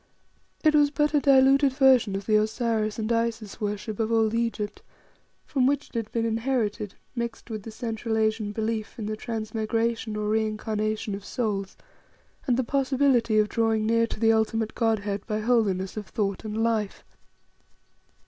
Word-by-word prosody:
It 310 Hz, -1 st, +5 dB
was 295 Hz, -1 st, +5 dB
but 295 Hz, +1 st, 0 dB
a 295 Hz, -, +5 dB
diluted 275 Hz, 0 st, +5 dB
version 260 Hz, -7 st, +4 dB
of 195 Hz, 0 st, -4 dB
the 215 Hz, -, +2 dB
Osiris 215 Hz, 0 st, 0 dB
and 220 Hz, 0 st, -2 dB
Isis 230 Hz, -3 st, -2 dB
worship 210 Hz, +1 st, -3 dB
of 225 Hz, 0 st, 0 dB
old 225 Hz, -1 st, +2 dB
Egypt, 230 Hz, -3 st, -2 dB, 0.6 s
from 260 Hz, -2 st, +1 dB
which 285 Hz, +1 st, 0 dB
it -, -, -31 dB
had 225 Hz, -2 st, -3 dB
been 230 Hz, -1 st, 0 dB
inherited, 225 Hz, -3 st, -1 dB, 0.2 s
mixed 235 Hz, -1 st, -5 dB
with 215 Hz, -1 st, -4 dB
the 225 Hz, -, -9 dB
Central 225 Hz, 0 st, -3 dB
Asian 215 Hz, -1 st, 0 dB
belief 220 Hz, 0 st, -3 dB
in 220 Hz, -, -4 dB
the 215 Hz, +1 st, -2 dB
transmigration 225 Hz, 0 st, -2 dB
or 210 Hz, 0 st, -2 dB
reincarnation 215 Hz, -1 st, -1 dB
of 195 Hz, 0 st, -6 dB
souls 200 Hz, -5 st, -3 dB, 0.7 s
and 245 Hz, -2 st, +2 dB
the 260 Hz, -, +1 dB
possibility 265 Hz, -4 st, +2 dB
of 210 Hz, 0 st, +4 dB
drawing 225 Hz, -1 st, +1 dB
near 230 Hz, +1 st, +3 dB
to 215 Hz, -, -7 dB
the 225 Hz, 0 st, +4 dB
ultimate 220 Hz, 0 st, 0 dB
Godhead 205 Hz, -3 st, 0 dB
by 215 Hz, -1 st, -1 dB
holiness 210 Hz, -5 st, +1 dB
of 210 Hz, -2 st, -6 dB
thought 200 Hz, -3 st, -2 dB
and 215 Hz, 0 st, -4 dB
life. 220 Hz, -3 st, -1 dB
225 Hz, 165 wpm, -26 LUFS, 215-235 Hz, 0.7 s, It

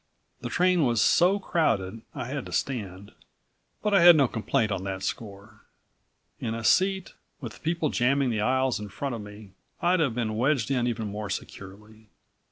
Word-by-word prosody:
The -, -, -5 dB
train 180 Hz, -2 st, +2 dB
was 120 Hz, -4 st, +1 dB
so 180 Hz, -, +4 dB
crowded 115 Hz, -, -1 dB
I -, -, -4 dB
had 135 Hz, +2 st, -5 dB
to -, -, -10 dB
stand, 100 Hz, -6 st, -4 dB, 0.7 s
but 210 Hz, -1 st, 0 dB
I 195 Hz, -, +5 dB
had 175 Hz, 0 st, +9 dB
no 140 Hz, -4 st, +4 dB
complaint 110 Hz, -1 st, -1 dB
on 95 Hz, -2 st, -2 dB
that 95 Hz, -1 st, -5 dB
score. 100 Hz, +1 st, -6 dB, 0.8 s
In 115 Hz, 0 st, -3 dB
a 115 Hz, -, -5 dB
seat, 190 Hz, -, +2 dB, 0.3 s
with -, -, -9 dB
people 165 Hz, -1 st, -1 dB
jamming 130 Hz, +1 st, +1 dB
the 110 Hz, -2 st, -1 dB
aisle 130 Hz, +2 st, +1 dB
in 105 Hz, -1 st, -7 dB
front 135 Hz, +6 st, -4 dB
of 115 Hz, -, -5 dB
me, 105 Hz, -1 st, -12 dB, 0.3 s
I'd 180 Hz, 0 st, +2 dB
have 135 Hz, -8 st, +1 dB
been 110 Hz, -3 st, -2 dB
wedged 130 Hz, 0 st, +1 dB
in 125 Hz, -2 st, +1 dB
even 115 Hz, -2 st, -2 dB
more 105 Hz, 0 st, -5 dB
securely. 105 Hz, +3 st, -9 dB
120 Hz, 175 wpm, -26 LUFS, 105-150 Hz, 0.8 s, had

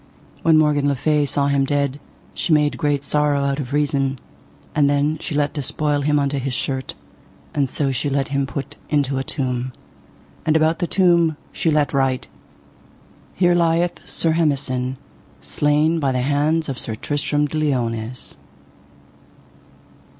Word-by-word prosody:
When 160 Hz, -1 st, +5 dB
Morgan 150 Hz, -2 st, +3 dB
le 140 Hz, -, +2 dB
Fay 150 Hz, +2 st, +1 dB
saw 140 Hz, +1 st, 0 dB
him 140 Hz, -1 st, +2 dB
dead 140 Hz, 0 st, 0 dB, 0.3 s
she -, -, -1 dB
made 150 Hz, -1 st, +3 dB
great 145 Hz, -3 st, 0 dB
sorrow 145 Hz, -1 st, +1 dB
out 140 Hz, +1 st, 0 dB
of 135 Hz, -2 st, -5 dB
reason; 140 Hz, -2 st, 0 dB, 0.6 s
and 145 Hz, -2 st, +3 dB
then 145 Hz, +2 st, +1 dB
she 155 Hz, -, -4 dB
let 145 Hz, 0 st, +1 dB
despoil 145 Hz, 0 st, -1 dB
him 150 Hz, +1 st, +2 dB
unto 140 Hz, -1 st, 0 dB
his 130 Hz, -1 st, -2 dB
shirt, 130 Hz, 0 st, -3 dB, 0.6 s
and 140 Hz, -3 st, +1 dB
so 140 Hz, +1 st, -1 dB
she 140 Hz, +2 st, -1 dB
let 135 Hz, 0 st, 0 dB
him 140 Hz, 0 st, 0 dB
put 140 Hz, -1 st, -6 dB
into 140 Hz, -3 st, +1 dB
a -, -, -2 dB
tomb. 130 Hz, -2 st, -2 dB, 0.7 s
And 160 Hz, -1 st, +3 dB
about 160 Hz, +1 st, +2 dB
the 175 Hz, -, 0 dB
tomb 170 Hz, -5 st, +3 dB
she 165 Hz, -, 0 dB
let 150 Hz, -2 st, +2 dB
write: 135 Hz, -2 st, 0 dB, 1.1 s
Here 175 Hz, -1 st, +3 dB
lieth 170 Hz, 0 st, +1 dB
Sir 165 Hz, -, 0 dB
Hemison, 135 Hz, -5 st, 0 dB, 0.4 s
slain 150 Hz, -, +1 dB
by 140 Hz, -3 st, +1 dB
the 130 Hz, -1 st, 0 dB
hands 150 Hz, +4 st, +1 dB
of 135 Hz, -3 st, -4 dB
Sir 110 Hz, -, -4 dB
Tristram 145 Hz, +4 st, -1 dB
de 155 Hz, +1 st, -3 dB
Liones. 120 Hz, -5 st, -2 dB
145 Hz, 155 wpm, -21 LUFS, 135-155 Hz, 1.1 s, When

